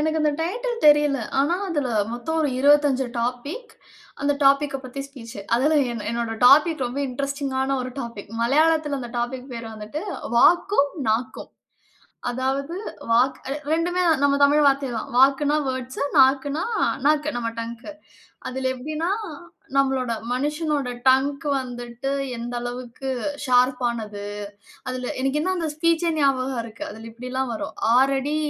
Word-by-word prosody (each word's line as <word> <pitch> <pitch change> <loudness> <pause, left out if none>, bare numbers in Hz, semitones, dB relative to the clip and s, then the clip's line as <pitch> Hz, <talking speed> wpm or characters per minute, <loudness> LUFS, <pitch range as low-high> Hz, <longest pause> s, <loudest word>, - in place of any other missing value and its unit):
எனக்கு 315 +1 0
அந்த 300 -1 +2
டைட்டில் 470 +7 -2
தெரியல. 295 -2 +4 0.2
ஆனா 295 +5 +2
அதுல 295 -6 -1 0.2
மொத்தம் 320 +7 -2
ஒரு 300 - +2
25 285 -1 +4 0.2
டாபிக். 280 - -4 0.5
அந்த 285 0 +3
டாபிக்க 275 0 +4
பத்தி 255 +2 -6
ஸ்பீச். 230 -6 -10 0.2
அதுல 280 +6 +3 0.2
எ - - -4 0.2
என்னோட 235 -1 -2
டாபிக் 295 +1 +5
ரொம்ப 250 +4 -4
இன்ட்ரஸ்டிங்கான 275 0 -2
ஒரு 255 - -5
டாபிக். 230 -5 -7
மலையாளத்ல 300 +3 +2
அந்த 240 -2 -7
டாபிக் 250 +2 -4
பேரு 230 -1 -6
வந்துட்டு, 215 +9 -6 0.3
வாக்கும் 340 - +4 0.2
நாக்கும். 240 +4 -2 0.8
அதாவது 270 +5 -2 0.4
வாக்கு 265 +4 +1
2 350 +3 +1 0.2
நம்ம 285 0 +4
தமிழ் 295 +1 +5
வார்த்தை 275 0 +3
தான். 220 - -6
வாக்குன்னா 280 +3 +4
வேர்ட்ஸ், 260 0 -4 0.2
நாக்குன்னா 275 +4 +4 0.4
நாக்கு 300 0 +3
நம்ம 230 -1 -2
டங்க்கு. 235 +5 -6 0.6
அதுல 260 +1 -2
எப்டின்னா, 310 +7 -3 0.7
நம்மளோட 265 -3 +1 0.2
மனுஷனோட 295 0 -1 0.2
டங்க் 275 +3 +3
வந்துட்டு, 245 +1 -5 0.3
எந்த 240 +1 -5
அளவுக்கு 245 +2 -6 0.4
ஷார்ப்பானது. 240 -5 +1 0.6
அதுல 255 0 -3
எனக்கு 270 +3 +1
என்ன 375 +4 0
அந்த 330 -2 -1
ஸ்பீச்சே 335 +1 +2
ஞாபகம் 265 -3 +1
இருக்கு. 225 -1 -8
அதுல 220 +2 -10
இப்டில்லாம் 250 +2 -4
வரும். - - -6 0.2
6 270 +2 +4
அடி 290 +3 -2
270 Hz, 135 wpm, -23 LUFS, 250-295 Hz, 0.8 s, டாபிக்